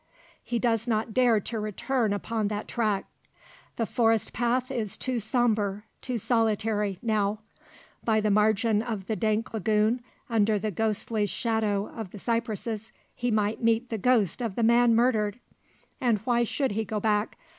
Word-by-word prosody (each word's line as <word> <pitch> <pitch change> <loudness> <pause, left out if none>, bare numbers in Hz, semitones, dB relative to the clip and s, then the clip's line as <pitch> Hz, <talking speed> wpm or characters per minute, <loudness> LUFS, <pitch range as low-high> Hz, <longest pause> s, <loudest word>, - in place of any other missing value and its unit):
He 240 - -2
does 230 -1 +1
not 220 -1 0
dare 245 -3 +4
to 225 +3 -4
return 215 +2 -1
upon 215 +1 -1
that 210 0 -4
track. 215 -5 0 0.7
The 230 - 0
forest 225 -1 +1
path 245 +2 0
is 220 -7 -2
too 255 -2 -1
sombre, 215 -3 0 0.2
too 250 -2 -2
solitary, 215 -3 0
now. 215 -2 0 0.6
By 220 -1 +2
the 210 -1 +1
margin 215 +1 +3
of 220 -5 -4
the 220 - -1
dank 220 0 -1
lagoon, 220 +3 +1 0.3
under 220 -2 +2
the 215 +1 -2
ghostly 215 +1 -1
shadow 215 -3 0
of 220 -5 -7
the 205 - -10
cypresses, 225 -1 -3 0.2
he 245 - -2
might 215 -1 0
meet 230 +1 +1
the 225 - -2
ghost 235 -2 +2
of 225 -5 -2
the 235 - 0
man 235 0 +5
murdered! 225 -3 +2 0.6
And 235 -4 +3
why 240 -1 +2
should 270 +2 -1
he 220 +2 -1
go 215 +1 -3
back? 210 0 0
220 Hz, 160 wpm, -27 LUFS, 210-235 Hz, 0.7 s, man